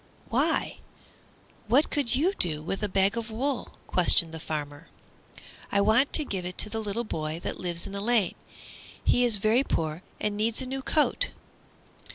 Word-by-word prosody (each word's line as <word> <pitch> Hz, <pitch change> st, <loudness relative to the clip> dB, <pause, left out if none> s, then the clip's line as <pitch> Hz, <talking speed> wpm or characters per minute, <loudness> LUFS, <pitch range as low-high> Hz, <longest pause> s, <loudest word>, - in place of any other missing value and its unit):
"Why, -, -, 0 dB, 0.9 s
what 265 Hz, +8 st, +3 dB
could 270 Hz, -5 st, +1 dB
you 335 Hz, +9 st, +2 dB
do 155 Hz, -, 0 dB
with 195 Hz, +5 st, -3 dB
a 210 Hz, -, -1 dB
bag 195 Hz, +3 st, +2 dB
of 230 Hz, -1 st, -4 dB
wool?" 255 Hz, +4 st, -3 dB
questioned 170 Hz, -2 st, +3 dB
the 160 Hz, -, -6 dB
farmer. 150 Hz, 0 st, -5 dB, 0.8 s
"I 200 Hz, -, +3 dB
want 220 Hz, +7 st, +4 dB
to 305 Hz, -, +4 dB
give 190 Hz, -7 st, -3 dB
it 180 Hz, 0 st, -6 dB
to 210 Hz, -, +2 dB
the 225 Hz, -, -2 dB
little 215 Hz, +2 st, -2 dB
boy 155 Hz, -6 st, -4 dB
that -, -, -4 dB
lives 175 Hz, -2 st, -3 dB
in 195 Hz, -, -8 dB
the 200 Hz, -, -3 dB
lane. 220 Hz, -4 st, +2 dB, 0.7 s
He 245 Hz, -, +3 dB
is 235 Hz, -3 st, +2 dB
very 220 Hz, +6 st, +3 dB
poor 160 Hz, -, -2 dB, 0.2 s
and 210 Hz, -1 st, -1 dB
needs 220 Hz, +2 st, +1 dB
a 260 Hz, -, -3 dB
new 265 Hz, +1 st, -4 dB
coat." 300 Hz, +3 st, +2 dB
210 Hz, 180 wpm, -27 LUFS, 175-240 Hz, 0.9 s, want